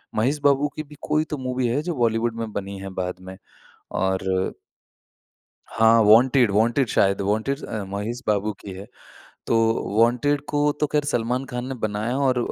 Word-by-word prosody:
महेश 130 +7 +1
बाबू 145 0 +3
की 155 - -4
भी 150 0 -15
कोई 155 0 +1
तो 150 - -2
मूवी 130 -1 -2
है 130 +6 0
जो 175 0 -2
बॉलीवुड 115 -1 0
में 110 -1 -4
बनी 100 0 -5
है 95 0 -6
बाद 90 -1 -3
में। 95 0 -8 0.6
और 95 0 0 1.5
हाँ, 115 0 +4
वांटेड 120 +1 +5
वांटेड 115 +5 +2
शायद 100 0 +2
वांटेड 110 +8 -1
अ, 110 -2 -4
महेश 105 +5 -4
बाबू 105 0 +1
की 100 - -9
है, 95 +2 -9 0.6
तो 115 - +2 0.4
वांटेड 125 +5 +2
को 145 - 0 0.2
तो 150 - +3
ख़ैर 150 -1 +2
सलमान 125 -1 -1
खान 125 0 -4
ने 135 - -4
बनाया 110 +4 -2
और 130 -3 +2
115 Hz, 175 wpm, -23 LUFS, 105-135 Hz, 1.5 s, वांटेड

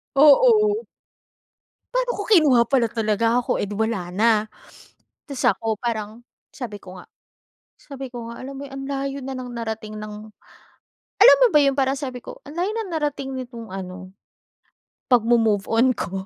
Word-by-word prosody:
Oo. 425 - +5 1.1
Pa'no - - +1
kung 410 - -5
kinuha 295 - +6
pala 255 -4 +2
talaga 225 +1 +1
ako 245 - -1
eh - - 0
di 205 - -6
wala 205 -6 -2
na. 215 +5 +2 1.0
Tas 275 -3 -5
ako 220 -2 0
parang 225 -1 -4 0.3
sabi 230 -6 -7
ko 185 -1 -12
nga, - - -13 0.7
sabi 270 -2 -9
ko 235 -2 -7
nga 235 - -9
alam 275 +1 -7
mo - - -6
yung 270 - -11
ang - - -6
layo 275 0 -3
na 265 0 -5
ng 250 -1 -7
narating 220 -2 -5
ng 215 0 -7 1.1
alam - - +9
mo - - +8
ba - - +8
yun 275 -1 +3
parang 270 0 0
sabi 255 -4 -6
ko - - -10
ang 290 - -10
layo 370 +4 0
ng 440 -5 -4
narating 290 -3 -2
nitong 240 -3 -7
ano, 185 0 -8 1.0
'pag 245 -3 +4
mo-move 225 -4 +2
on 240 +3 +3
ko. 195 - -5
245 Hz, 170 wpm, -22 LUFS, 220-275 Hz, 1.1 s, alam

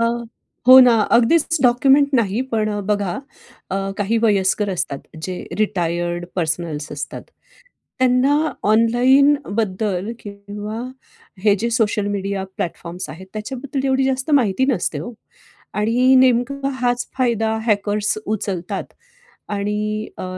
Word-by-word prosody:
अ, - - +3 0.6
हो 260 0 +11
ना, 245 -2 +6 0.2
अगदीच 315 +8 +3
डॉक्युमेंट 270 +3 +4
नाही, 225 -1 +1
पण 215 -1 +1 0.2
बघा 205 -3 0 0.6
अ, 190 - -1 0.2
काही 210 +3 +1
वयस्कर 205 -1 +2
असतात 170 -6 -3 0.2
जे 185 +2 -5 0.2
रिटायर्ड 175 -4 -1
पर्सनल्स 160 -3 -2
असतात. 145 - -6 0.8
त्यांना 270 +5 +2 0.2
ऑनलाईनबद्दल 225 -4 +2
किंवा 205 +2 -7 0.6
हे, 205 -2 +5
जे 235 - -1
सोशल 220 -3 0
मीडिया 200 -1 -2
प्लॅटफॉर्म्स 175 +1 -5
आहेत, 185 +4 -9
त्याच्याबद्दल 260 +5 -4
एवढी 265 0 +2
जास्त 265 +3 -1
माहिती 260 -2 +3
नसते 175 - -1
हो. 205 +10 -7 0.6
आणि 245 +5 +3
नेमका, 260 +2 +2
हाच 245 -2 -1
फायदा 225 -3 +1
हॅकर्स 210 0 0
उचलतात 195 -4 -4 0.6
आणि 210 +1 -2
अ, - - -5
215 Hz, 115 wpm, -20 LUFS, 200-250 Hz, 0.8 s, हो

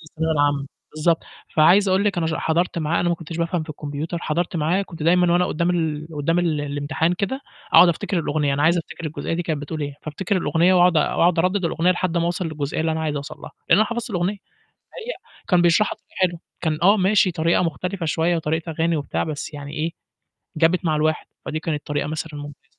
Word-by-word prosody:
الثانوية 160 +1 -1
العامة 145 -2 +1 0.3
بالضبط، 165 +2 +1 0.3
فعايز 185 +6 +5
أقول 190 +2 +2
لِك 195 -4 +1
أنا 165 - 0
ش 160 - -1
حضرت 170 +2 0
معاه 155 +1 0
أنا 175 - +1
ما 175 - +2
كنتش 165 0 -8
بافهم 170 0 -1
في 155 - -8
الكمبيوتر، 150 +3 -4
حضرت 170 +1 -2
معاه 170 +6 +1
كنت 165 -5 -9
دايمًا 175 +1 +4
وأنا 180 +1 +3
قدّام 170 +3 0
ال 160 -3 -1
قدّام 165 +4 +1
ال 160 -4 +1
الامتحان 145 +4 -1
كده 200 +9 -2 0.3
أقعد 180 - +8
أفتكر 185 +2 -1
الأغنية 145 -3 0
أنا 145 - 0
عايز 170 +3 +4
أفتكر 165 0 -6
الجزئية 155 +1 -3
دي 175 - -1
كانت 155 -4 -3
بتقول 155 +1 -5
إيه، 145 -1 -4
فأفتكر 175 +6 -2
الأغنية 170 +2 +3
وأقعد 180 -2 +5
أقعد 165 +3 +2
أردد 185 +2 +1
الأغنية 170 +2 +2
لحد 175 -1 0
ما 170 - +2
اوصل 175 +1 -1
للجزئية 150 -1 -3
اللي 160 0 +1
أنا 160 - -2
عايز 150 -2 -1
أوصل 140 +1 -6
لها، - - -9 0.2
لإن - - +6
أنا 215 - +4
حفظت 235 0 -4
الأغنية، 180 +1 0 0.4
هي - - -8 0.4
كان 180 -2 +4
بيشرحها 175 +5 +3
بطريقة - - -30
حلوه 175 -2 +1 0.2
كان 155 -2 -1
آه، 200 +4 +6
ماشي 190 0 +3
طريقة 170 +1 +1
مختلفة 175 +2 -3
شوية 165 +2 +1
وطريقة 160 +1 -2
أغاني 165 +1 0
وبتاع 145 - -2
بس 155 0 -5
يعني 145 0 -7
إيه 160 +2 -1 0.7
جابت 170 +3 +2
مع 155 -1 +2
الواحد، 155 +1 0 0.2
فدي 155 - -3
كانت 155 -2 -3
طريقة 145 0 -1
مثلًا 155 -1 -5
ممتازة. 145 -1 -10
165 Hz, 215 wpm, -22 LUFS, 155-175 Hz, 0.7 s, أقعد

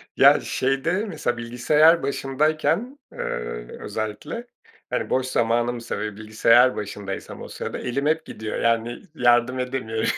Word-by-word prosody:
Ya, - - +7
şeyde 145 +10 0
mesela 155 - -2
bilgisayar 150 +8 +4
başındayken, 155 - 0
ııı, - - -6 0.6
özellikle, 110 - -5 0.4
hani, - - -2
boş 130 0 +1
zamanımsa 120 0 0
ve 105 -1 -4
bilgisayar 115 +4 +4
başındaysam 100 -1 -6
o - - -7
sırada - - -5
elim 135 +4 -2
hep 160 +1 +1
gidiyor 110 0 -5
yani 115 +1 0
yardım 120 0 +3
edemiyorum. 125 -3 -2
125 Hz, 125 wpm, -24 LUFS, 115-150 Hz, 0.6 s, Ya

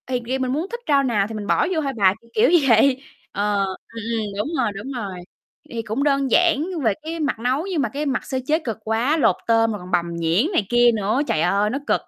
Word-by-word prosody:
Thì 250 -1 -1
vì 260 +3 -1
mình 255 -1 -1
muốn 310 +7 -1
thích 475 - -4
rau 280 -2 +4
nào 210 -6 +1
thì 225 - -8
mình 210 -1 -5
bỏ - - +2
vô 320 - 0
thôi 275 -2 -2
bà, 190 -3 +4
kiểu, 230 - -23
kiểu 445 - +4 0.2
vậy. 255 +4 +4 0.3
Ờ, 205 0 -1
ừm, 190 -1 -4 0.4
ừm, 220 - -2
đúng 210 - -1
rồi, 240 -5 +1
đúng 210 +8 -6
rồi, 200 -8 -5 0.5
thì - - -9
thì 230 - -1
cũng 225 +5 -2
đơn 275 -3 +1
giản 335 -2 +3 0.2
về 220 -3 +3
cái 325 +2 -5
mặt 290 -7 -1
nấu 255 +7 0
nhưng 355 -6 -1
mà - - -1
cái 290 +2 -4
mặt 265 -3 -2
sơ 260 - -2
chế 310 +2 +2
cực 235 -9 -5
quá, 230 +8 +1
lột 310 - +3
tôm 225 -1 +3
rồi 210 - -4
còn 180 +1 -10
bằm 170 -1 0
nhuyễn 170 - +1
này 215 - +1
kia 240 0 +5
nữa, 215 +5 0
trời 155 - +1
ơi, 200 +4 +2
nó 265 +5 -2
cực. - - +2
240 Hz, 265 wpm, -22 LUFS, 210-280 Hz, 0.5 s, kia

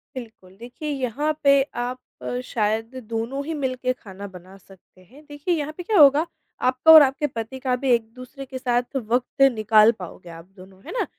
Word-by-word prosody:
बिल्कुल, 220 -7 -11
देखिए 245 +7 -8
यहाँ 275 +2 -1
पे 280 - +5 0.3
आप 250 +1 -5 0.5
शायद 225 +2 -2
दोनों 230 +5 -3
ही 320 +2 -4
मिलके 255 -3 -2
खाना 200 -5 -10
बना 185 +2 -14
सकते 190 -1 -21
हैं, 255 +11 -18
देखिए 290 +4 -2
यहाँ 305 -1 -3
पे 360 - -6
क्या 410 +2 +1
होगा? 295 +2 +6 0.3
आपका 255 +5 +4
और 315 -1 +11
आपके 275 +2 +1
पति 235 0 -6
का 255 -1 -1
भी 265 +1 -2
एक-दूसरे 245 +4 -4
के 260 0 -7
साथ 245 0 -1
वक़्त 250 +3 -1
निकाल 215 0 +4
पाओगे 180 -1 -10
आप 165 0 -11
दोनों, 190 0 -16
है - - -7
ना? - - -1
250 Hz, 180 wpm, -23 LUFS, 220-280 Hz, 0.5 s, और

